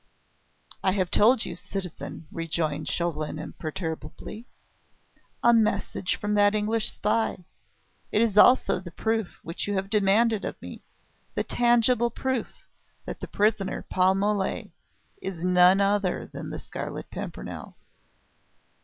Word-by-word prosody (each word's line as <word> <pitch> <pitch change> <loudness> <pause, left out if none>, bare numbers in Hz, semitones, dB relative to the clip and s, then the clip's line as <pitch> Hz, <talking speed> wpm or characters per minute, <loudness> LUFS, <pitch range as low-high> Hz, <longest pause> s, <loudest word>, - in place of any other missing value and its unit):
"I 190 - +3
have 185 -3 0
told 230 +3 +4
you, 175 - -5
citizen," 180 -2 -6
rejoined 155 -2 -2
Chauvelin 155 -3 -2
imperturbably. 160 - -6 1.0
"A 235 - +6
message 215 -4 +1
from 210 0 -2
that 205 0 +4
English 215 +1 +1
spy. 210 -4 -1 0.7
It - - +2
is 220 -4 0
also 250 -1 +6
the 180 -1 -9
proof 220 +2 -2
which 165 +4 -3
you 205 - -1
have 195 +1 -2
demanded 210 +1 +3
of - - -5
me - - -9 0.5
the - - 0
tangible 240 0 +3
proof 260 0 -3 0.4
that - - -6
the - - -6
prisoner, 205 -2 0
Paul 185 +1 +4
Mole, 200 0 -1 0.5
is 180 -3 -5
none 180 +1 +6
other 200 -1 +1
than - - -8
the - - -5
Scarlet - - -6
Pimpernel." - - -7
200 Hz, 125 wpm, -26 LUFS, 180-220 Hz, 1.0 s, A